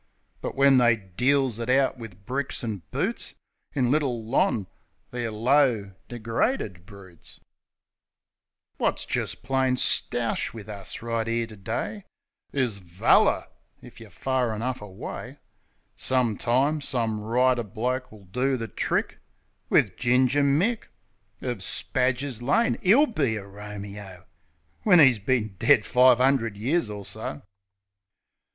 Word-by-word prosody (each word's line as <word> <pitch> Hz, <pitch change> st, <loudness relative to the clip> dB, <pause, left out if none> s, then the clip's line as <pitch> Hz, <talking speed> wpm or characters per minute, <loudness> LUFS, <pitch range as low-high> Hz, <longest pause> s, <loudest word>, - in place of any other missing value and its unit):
But -, -, -5 dB
when 140 Hz, -1 st, +5 dB
they 120 Hz, -1 st, +5 dB
deals 125 Hz, +5 st, 0 dB
it 115 Hz, +1 st, -4 dB
out 135 Hz, +1 st, +3 dB
wiv 100 Hz, -4 st, -11 dB
bricks 130 Hz, +2 st, -3 dB
an' 110 Hz, -5 st, -4 dB
boots -, -, -2 dB, 0.4 s
In 125 Hz, -3 st, +1 dB
Little 130 Hz, -7 st, 0 dB
Lon., 120 Hz, -, +1 dB, 0.5 s
they're 120 Hz, -2 st, -3 dB
low, 115 Hz, -2 st, +2 dB
degraded 115 Hz, -, -2 dB
broots. 95 Hz, -5 st, -12 dB
THE -, -, -25 dB
PLAY -, -, -51 dB
41 -, -, +3 dB
Wot's -, -, -4 dB
jist -, -, -3 dB
plain 130 Hz, 0 st, +1 dB
stoush 120 Hz, -2 st, +1 dB
wiv 110 Hz, -2 st, -9 dB
us, 100 Hz, +1 st, -6 dB
right 115 Hz, -1 st, -2 dB
'ere 115 Hz, 0 st, 0 dB
to 110 Hz, -1 st, -12 dB
day, 115 Hz, -, -4 dB, 0.5 s
Is 125 Hz, -7 st, -1 dB
"valler" 90 Hz, -1 st, +3 dB, 0.4 s
if -, -, -13 dB
yer -, -, -12 dB
fur 130 Hz, -4 st, -1 dB
enough 120 Hz, +3 st, -3 dB
away. 100 Hz, -2 st, -8 dB, 0.6 s
Some 125 Hz, -4 st, +1 dB
time, 135 Hz, +8 st, +1 dB
some 115 Hz, -6 st, -1 dB
writer 125 Hz, +3 st, +2 dB
bloke 125 Hz, +4 st, -3 dB
will 105 Hz, -2 st, -15 dB
do 125 Hz, +7 st, 0 dB
the 115 Hz, -1 st, -4 dB
trick -, -, -2 dB, 0.5 s
Wiv -, -, +3 dB
Ginger 130 Hz, +3 st, +3 dB
Mick, 170 Hz, +12 st, +1 dB, 0.6 s
Of 125 Hz, -4 st, -3 dB
Spadger's 125 Hz, +4 st, -1 dB
Lane. 145 Hz, -, +1 dB
'E'll 230 Hz, +11 st, +6 dB
be 140 Hz, -, -1 dB
a 100 Hz, -2 st, -6 dB
Romeo, 100 Hz, -2 st, -9 dB, 0.6 s
When 180 Hz, -5 st, +5 dB
'e's 130 Hz, -7 st, +6 dB
bin 110 Hz, -2 st, -1 dB
dead 135 Hz, -7 st, +4 dB
five 125 Hz, -1 st, +5 dB
'undred 125 Hz, -5 st, +2 dB
years 130 Hz, +5 st, 0 dB
or 105 Hz, -1 st, -7 dB
so. 75 Hz, -, -6 dB
120 Hz, 135 wpm, -25 LUFS, 105-135 Hz, 0.6 s, E'll